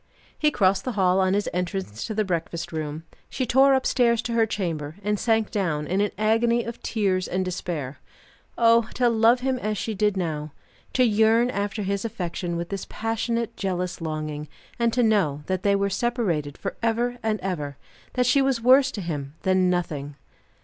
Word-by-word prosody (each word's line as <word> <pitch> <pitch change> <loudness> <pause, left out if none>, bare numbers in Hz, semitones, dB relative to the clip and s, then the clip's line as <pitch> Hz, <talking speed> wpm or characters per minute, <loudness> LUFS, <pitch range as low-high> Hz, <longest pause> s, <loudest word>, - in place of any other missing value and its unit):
He 305 - +2
crossed 195 -8 +2
the 255 - -3
hall 190 -2 +3
on 190 0 +2
his 205 - 0
entrance 180 - -3
to 220 - -4
the 215 0 +1
breakfast 170 -2 -3
room. 155 -1 -4 0.3
She 260 - -2
tore 270 +3 +5
upstairs 240 -3 +2
to 240 - -3
her 225 -1 +3
chamber, 160 -8 -3
and 210 0 0
sank 225 -2 +1
down 160 -7 -1
in 185 +5 0
an 205 - +2
agony 230 +2 +2
of 235 +1 -7
tears 190 -4 0
and 185 +1 -1
despair. 165 -6 -4 0.6
Oh, 230 -1 +4
to 245 -1 +3
love 230 +2 +4
him 260 -1 0
as 215 -2 -2
she 220 - -3
did 210 0 +1
now! 155 -4 -3 0.4
To 255 - +4
yearn 225 +2 +4
after 205 0 -2
his 195 0 -1
affection 175 -5 -3
with 170 0 -4
this 195 -2 -5
passionate, 225 +1 -2
jealous 180 -2 -3
longing, 155 -1 -4 0.3
and 235 -1 +2
to 245 +1 +2
know 185 -10 +2
that 185 +1 -1
they 200 +1 +3
were 200 0 0
separated 190 - -1
for - - -5
ever 240 +2 0
and 215 -1 0
ever; 150 -7 -3 0.4
that 250 -1 +1
she 275 +3 +4
was 270 -3 +1
worse 260 +3 +5
to 205 - -4
him 145 -4 -5
than 185 -1 +3
nothing! 150 -5 -2
200 Hz, 185 wpm, -25 LUFS, 175-230 Hz, 0.6 s, tore